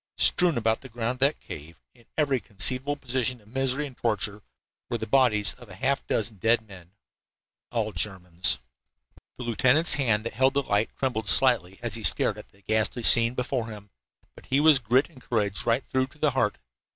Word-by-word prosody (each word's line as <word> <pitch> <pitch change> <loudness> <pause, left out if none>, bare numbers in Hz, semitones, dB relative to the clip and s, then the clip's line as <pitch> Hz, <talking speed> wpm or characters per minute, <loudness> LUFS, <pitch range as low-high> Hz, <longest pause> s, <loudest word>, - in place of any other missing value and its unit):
Strewn 175 -5 +3
about 110 -1 0
the 130 - -11
ground 120 +1 -3
of - - -28
that 140 +3 +2
cave, 80 +2 -10
in 120 -1 -24
every 140 -4 +1
conceivable 130 +8 +2
position 130 -2 -2
of 105 - -24
misery 135 +3 0
and 135 -3 -10
torture, 105 -3 -2 0.5
were - - -1
the - - -5
bodies 105 -4 +3
of 120 - -16
half 135 +9 -1
a - - -37
dozen 110 -1 -2
dead 110 +3 +2
men, 90 -2 -14 0.8
all 110 -3 -1
Germans. 90 -7 -2 0.8
The 125 - -6
lieutenant's 130 +7 +3
hand 115 -6 +1
that 115 - -4
held 130 +4 +2
the 140 - +1
light 105 -1 0
trembled 110 -6 -1
slightly 95 -5 +4
as 120 -4 -3
he 115 - -3
stared - - +1
at - - -13
the 100 0 -26
ghastly 110 +3 -1
scene 115 +2 +5
before 125 -2 -2
him, 105 -3 -11 0.4
but - - -17
he 135 - +2
was 150 -2 +6
grit 125 +4 +2
and 145 -7 -18
courage 105 -5 -2
right 120 +3 +1
through 130 0 -1
to 145 - -22
the 150 -1 +1
heart. 105 -6 0
120 Hz, 195 wpm, -26 LUFS, 105-130 Hz, 0.8 s, was